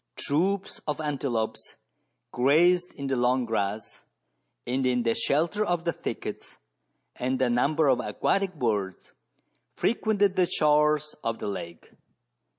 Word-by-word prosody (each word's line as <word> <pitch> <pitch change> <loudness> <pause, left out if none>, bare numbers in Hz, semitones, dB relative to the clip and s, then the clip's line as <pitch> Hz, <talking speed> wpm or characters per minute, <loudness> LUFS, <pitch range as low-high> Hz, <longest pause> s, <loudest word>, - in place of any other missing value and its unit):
Troops 190 +7 -1
of 150 0 -2
antelopes 135 -7 -3 0.6
grazed 175 +8 +3
in 140 - -6
the 135 -1 0
long 125 +1 +2
grass 105 -2 -3 0.6
and 130 +2 -1
in 125 -1 +1
the 115 -1 +2
shelter 170 - 0
of 175 -4 -1
the 170 - +1
thickets, - - -6 0.6
and 130 +1 -1
a 130 -2 +2
number 145 +6 +2
of 130 -2 +3
aquatic 195 +7 0
birds 105 -8 -2 0.6
frequented 205 -3 +1
the 180 -1 +3
shores 150 -2 +2
of 115 0 -1
the - - -5
lake. 85 -4 -7
140 Hz, 130 wpm, -27 LUFS, 120-170 Hz, 0.6 s, grazed